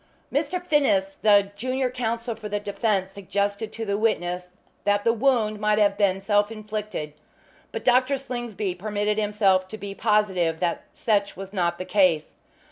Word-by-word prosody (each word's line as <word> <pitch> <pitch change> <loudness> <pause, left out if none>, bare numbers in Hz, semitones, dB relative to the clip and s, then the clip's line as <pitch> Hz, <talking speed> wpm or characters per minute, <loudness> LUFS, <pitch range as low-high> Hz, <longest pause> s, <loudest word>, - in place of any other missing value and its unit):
Mr. 310 +6 0
Finnis, 275 - +1
the 205 -2 +5
junior 255 +3 -1
counsel 235 -1 -2
for 215 -1 -7
the 205 0 -1
defence, 200 -2 -1
suggested 200 +2 -2
to 225 0 -5
the 200 0 -1
witness 180 -5 0 0.3
that 205 0 +2
the 230 - +3
wound 230 -3 +1
might 210 0 +2
have 205 -2 +3
been 195 -2 +1
self 205 +1 +2
inflicted, 215 -8 -5 0.6
but - - -5
Dr. 255 +2 +4
Slingsby 240 -7 -4
permitted 210 +3 -1
himself 200 -3 +2
to 215 - -7
be 200 -1 -6
positive 195 -7 +1
that 175 -2 -1
such 205 -3 0
was 195 +1 -8
not 170 -3 0
the 185 - -5
case. 185 -5 +2
210 Hz, 160 wpm, -25 LUFS, 195-225 Hz, 0.6 s, the